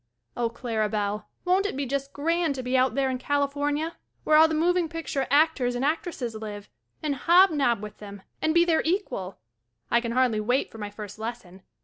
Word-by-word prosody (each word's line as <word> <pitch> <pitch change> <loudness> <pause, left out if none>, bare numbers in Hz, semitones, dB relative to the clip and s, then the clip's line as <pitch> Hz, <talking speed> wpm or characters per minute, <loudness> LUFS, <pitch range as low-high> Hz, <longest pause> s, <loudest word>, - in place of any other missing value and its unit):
Oh, 235 -1 0
Clara 225 -3 -2
Bell, 210 0 -2 0.2
won't 375 +3 +3
it 335 - -5
be 280 - -1
just 275 +1 -3
grand 330 +1 0
to 260 - -5
be 250 +1 -1
out 255 -2 +3
there 270 -1 +1
in 255 - -3
California 285 +3 -1 0.3
where 310 - +3
all 315 +1 +8
the 320 - -2
moving 345 +1 +2
picture 315 -5 -3
actors 285 -4 +3
and 250 +3 -1
actresses 300 -6 -2
live 210 -2 -7 0.3
and 300 -2 0
hob 345 +7 +5
nob 240 -8 +1
with 210 - -9
them 200 -2 -10 0.2
and 315 - +2
be 340 +1 +4
their 330 -2 +3
equal! 315 - -2 0.5
1 235 - +3
can 235 -1 -3
hardly 250 -4 +2
wait 245 +5 0
for 225 - -11
my 205 -1 -4
first 210 0 -9
lesson. 220 -5 -7
265 Hz, 205 wpm, -26 LUFS, 225-315 Hz, 0.5 s, all